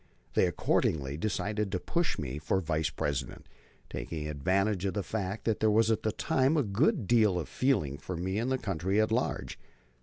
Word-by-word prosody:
They -, -, +4 dB
accordingly 70 Hz, -3 st, 0 dB
decided 105 Hz, +3 st, -1 dB
to 90 Hz, -, -1 dB
push 170 Hz, -, -1 dB
me 70 Hz, -1 st, -4 dB
for 85 Hz, +5 st, 0 dB
Vice 80 Hz, -3 st, 0 dB
President, 70 Hz, -2 st, -3 dB, 0.4 s
taking 75 Hz, -2 st, -5 dB
advantage 95 Hz, +6 st, 0 dB
of 95 Hz, -, -1 dB
the 100 Hz, -, -1 dB
fact 100 Hz, +2 st, -3 dB
that 110 Hz, -2 st, +1 dB
there 110 Hz, -, +3 dB
was 110 Hz, +1 st, +4 dB
at 110 Hz, -, +1 dB
that 110 Hz, -, -2 dB
time 135 Hz, +4 st, +2 dB
a 145 Hz, -, +3 dB
good 125 Hz, -, +1 dB
deal 110 Hz, -4 st, +4 dB
of 85 Hz, -, -3 dB
feeling 75 Hz, -, 0 dB
for 85 Hz, +4 st, -5 dB
me 95 Hz, +4 st, -1 dB
in 120 Hz, +3 st, -1 dB
the 130 Hz, -, +1 dB
country 95 Hz, -3 st, -1 dB
at 110 Hz, 0 st, +2 dB
large. 120 Hz, +3 st, -1 dB
100 Hz, 190 wpm, -30 LUFS, 80-110 Hz, 0.4 s, They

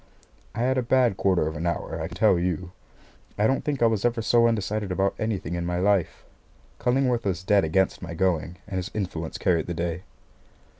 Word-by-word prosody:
I -, -, -2 dB
had 130 Hz, +1 st, +2 dB
a -, -, +1 dB
bad 125 Hz, -3 st, +2 dB
quarter 95 Hz, -4 st, +2 dB
of 80 Hz, +1 st, -3 dB
an 80 Hz, +3 st, -2 dB
hour, 80 Hz, -1 st, -3 dB
I 80 Hz, -, -2 dB
can 85 Hz, +1 st, -9 dB
tell 105 Hz, -5 st, +4 dB
you. 90 Hz, 0 st, -2 dB, 0.7 s
I 105 Hz, -, +2 dB
don't 135 Hz, +4 st, +1 dB
think 140 Hz, -5 st, -1 dB
I -, -, +7 dB
was 110 Hz, -3 st, +1 dB
ever 120 Hz, -1 st, +1 dB
so 115 Hz, +1 st, +4 dB
undecided 105 Hz, -2 st, -1 dB
about 95 Hz, +2 st, +1 dB
anything 100 Hz, -7 st, -2 dB
in 85 Hz, 0 st, -2 dB
my 90 Hz, 0 st, -2 dB
life. 95 Hz, -1 st, +1 dB, 0.5 s
Cullingworth 125 Hz, -1 st, +1 dB
was 90 Hz, -3 st, -1 dB
dead 100 Hz, +1 st, +3 dB
against 90 Hz, +4 st, +1 dB
my 85 Hz, -2 st, -6 dB
going, 90 Hz, -2 st, 0 dB
and 100 Hz, -3 st, -5 dB
his 90 Hz, +1 st, -3 dB
influence 85 Hz, -6 st, -3 dB
carried 85 Hz, -4 st, +1 dB
the 85 Hz, -, -3 dB
day. 85 Hz, +1 st, -2 dB
95 Hz, 205 wpm, -25 LUFS, 85-115 Hz, 0.7 s, I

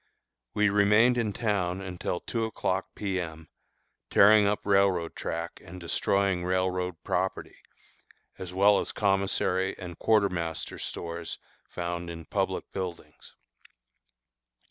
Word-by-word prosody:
We 105 Hz, -1 st, +4 dB
remained 105 Hz, +5 st, +4 dB
in 110 Hz, -3 st, 0 dB
town 100 Hz, -4 st, -1 dB
until 90 Hz, -2 st, -4 dB
two 115 Hz, -2 st, -2 dB
o'clock 95 Hz, -3 st, -2 dB
P. 95 Hz, -2 st, -2 dB
M., 80 Hz, -2 st, -8 dB, 0.6 s
tearing 105 Hz, 0 st, +6 dB
railroad 95 Hz, -4 st, +2 dB
track 85 Hz, +1 st, -5 dB
and 90 Hz, +2 st, -10 dB
destroying 95 Hz, +1 st, +1 dB
railroad 90 Hz, -1 st, -1 dB
property, -, -, -2 dB, 0.8 s
as 90 Hz, -1 st, -6 dB
well 100 Hz, +2 st, +5 dB
as -, -, -2 dB
commissary 95 Hz, -1 st, +1 dB
and 85 Hz, -2 st, -8 dB
quartermaster 90 Hz, -7 st, 0 dB
stores 85 Hz, 0 st, -5 dB, 0.3 s
found 85 Hz, 0 st, -4 dB
in 85 Hz, -1 st, -8 dB
public -, -, -2 dB
buildings. 90 Hz, -3 st, -7 dB
95 Hz, 110 wpm, -28 LUFS, 85-100 Hz, 0.8 s, tearing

